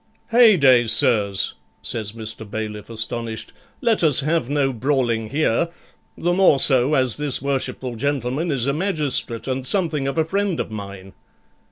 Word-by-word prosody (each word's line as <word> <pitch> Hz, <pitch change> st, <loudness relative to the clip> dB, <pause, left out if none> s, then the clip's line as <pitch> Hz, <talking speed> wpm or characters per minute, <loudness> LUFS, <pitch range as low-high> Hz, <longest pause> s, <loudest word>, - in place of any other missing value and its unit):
'Heyday, 155 Hz, -, +5 dB
sirs,' 110 Hz, -6 st, +2 dB, 0.3 s
says 110 Hz, -3 st, -4 dB
Mr. 110 Hz, -1 st, -6 dB
Bailiff, 105 Hz, 0 st, -6 dB
astonished, 115 Hz, 0 st, -4 dB, 0.3 s
'let 230 Hz, -7 st, +1 dB
us 150 Hz, -5 st, +5 dB
have 155 Hz, -2 st, -1 dB
no 140 Hz, -2 st, 0 dB
brawling 120 Hz, -3 st, -1 dB
here, 155 Hz, +3 st, 0 dB, 0.5 s
the 175 Hz, +1 st, 0 dB
more 180 Hz, -7 st, +4 dB
so 130 Hz, +2 st, +3 dB
as 130 Hz, -4 st, +1 dB
this 145 Hz, -3 st, -1 dB
worshipful 130 Hz, -2 st, -3 dB
gentleman 140 Hz, +5 st, -2 dB
is 130 Hz, -5 st, -1 dB
a 140 Hz, -, 0 dB
magistrate 150 Hz, -, +1 dB
and 130 Hz, 0 st, -2 dB
something 155 Hz, -3 st, 0 dB
of 135 Hz, -, -4 dB
a 160 Hz, -, +2 dB
friend 195 Hz, 0 st, -2 dB
of -, -, -4 dB
mine.' 100 Hz, -2 st, -9 dB
135 Hz, 150 wpm, -21 LUFS, 115-155 Hz, 0.5 s, Heyday